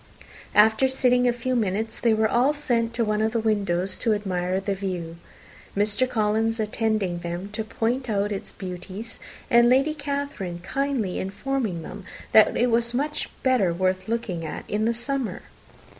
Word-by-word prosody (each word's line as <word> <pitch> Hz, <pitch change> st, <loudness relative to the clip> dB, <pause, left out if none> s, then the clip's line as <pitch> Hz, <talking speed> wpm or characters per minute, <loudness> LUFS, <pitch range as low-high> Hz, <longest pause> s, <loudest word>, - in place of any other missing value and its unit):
After 220 Hz, +5 st, +6 dB
sitting 250 Hz, -1 st, +3 dB
a -, -, +4 dB
few 245 Hz, +2 st, -2 dB
minutes, 220 Hz, -1 st, -1 dB
they 235 Hz, -, +3 dB
were 220 Hz, 0 st, +3 dB
all 250 Hz, +6 st, +3 dB
sent 240 Hz, -6 st, 0 dB
to 230 Hz, -1 st, +1 dB
one 210 Hz, 0 st, 0 dB
of 220 Hz, +1 st, +1 dB
the 230 Hz, -, +1 dB
windows 195 Hz, -4 st, 0 dB
to 225 Hz, -3 st, +2 dB
admire 185 Hz, -2 st, -1 dB
the 195 Hz, +1 st, -2 dB
view, 180 Hz, -4 st, -4 dB, 0.6 s
Mr. 210 Hz, +5 st, +2 dB
Collins 225 Hz, 0 st, +1 dB
attending 215 Hz, -4 st, 0 dB
them 175 Hz, +3 st, -5 dB
to 220 Hz, +1 st, -3 dB
point 240 Hz, +3 st, -2 dB
out 205 Hz, -1 st, 0 dB
its 195 Hz, -, -4 dB
beauties, 190 Hz, +4 st, -7 dB, 0.3 s
and 235 Hz, 0 st, +6 dB
Lady 270 Hz, +5 st, +4 dB
Catherine 280 Hz, -, -4 dB
kindly 245 Hz, -2 st, -1 dB
informing 200 Hz, -, -2 dB
them 200 Hz, +4 st, -8 dB, 0.3 s
that 215 Hz, -, +6 dB
it 245 Hz, 0 st, +2 dB
was 235 Hz, +1 st, +1 dB
much 295 Hz, +3 st, -1 dB
better 250 Hz, -9 st, +3 dB
worth 185 Hz, +2 st, 0 dB
looking 220 Hz, -7 st, -2 dB
at 155 Hz, -, -6 dB
in 215 Hz, +1 st, 0 dB
the 230 Hz, -, +2 dB
summer. 265 Hz, 0 st, -3 dB
220 Hz, 165 wpm, -25 LUFS, 195-245 Hz, 0.6 s, After